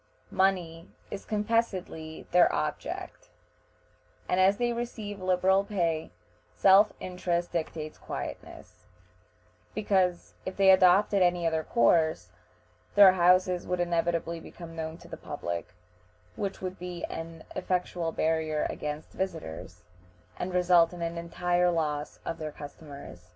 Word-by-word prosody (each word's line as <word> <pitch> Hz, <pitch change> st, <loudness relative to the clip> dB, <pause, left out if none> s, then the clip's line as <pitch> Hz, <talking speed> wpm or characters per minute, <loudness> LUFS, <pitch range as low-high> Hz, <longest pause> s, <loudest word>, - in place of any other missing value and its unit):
Money 175 Hz, -4 st, 0 dB, 0.2 s
is -, -, -6 dB
confessedly 205 Hz, -7 st, -2 dB
their 175 Hz, 0 st, +5 dB
object, 150 Hz, 0 st, -4 dB, 1.0 s
and, 180 Hz, -, +1 dB
as 195 Hz, +2 st, +5 dB
they 240 Hz, +1 st, 0 dB
receive 220 Hz, -4 st, -5 dB
liberal 185 Hz, +1 st, +3 dB
pay, 170 Hz, -6 st, -1 dB, 0.5 s
self 200 Hz, +2 st, +6 dB
interest 175 Hz, -1 st, -2 dB
dictates 155 Hz, -2 st, -4 dB
quietness, -, -, -8 dB, 0.9 s
because 190 Hz, -4 st, +1 dB
if 185 Hz, -, -6 dB
they 195 Hz, -1 st, +7 dB
adopted 190 Hz, +2 st, +5 dB
any 175 Hz, -1 st, +2 dB
other 160 Hz, -1 st, +1 dB
course, 135 Hz, -, +2 dB, 0.6 s
their 200 Hz, -2 st, +9 dB
houses 180 Hz, 0 st, +3 dB
would 180 Hz, 0 st, -1 dB
inevitably 170 Hz, -1 st, 0 dB
become 165 Hz, 0 st, -11 dB
known 160 Hz, 0 st, -5 dB
to -, -, -15 dB
the -, -, -8 dB
public, 85 Hz, 0 st, -5 dB, 0.7 s
which 195 Hz, -1 st, -4 dB
would 185 Hz, 0 st, -5 dB
be 180 Hz, -1 st, -6 dB
an 165 Hz, 0 st, -6 dB
effectual 180 Hz, -2 st, -1 dB
barrier 160 Hz, -1 st, 0 dB
against 150 Hz, +1 st, -5 dB
visitors, 165 Hz, -, -5 dB, 0.6 s
and 180 Hz, -, -3 dB
result 180 Hz, -1 st, +4 dB
in 175 Hz, -1 st, -5 dB
an 170 Hz, 0 st, -3 dB
entire 175 Hz, +1 st, +1 dB
loss 150 Hz, -3 st, -2 dB
of 165 Hz, -, -4 dB
their 155 Hz, -1 st, -4 dB
customers. 140 Hz, -, -11 dB
175 Hz, 125 wpm, -28 LUFS, 160-185 Hz, 1.0 s, their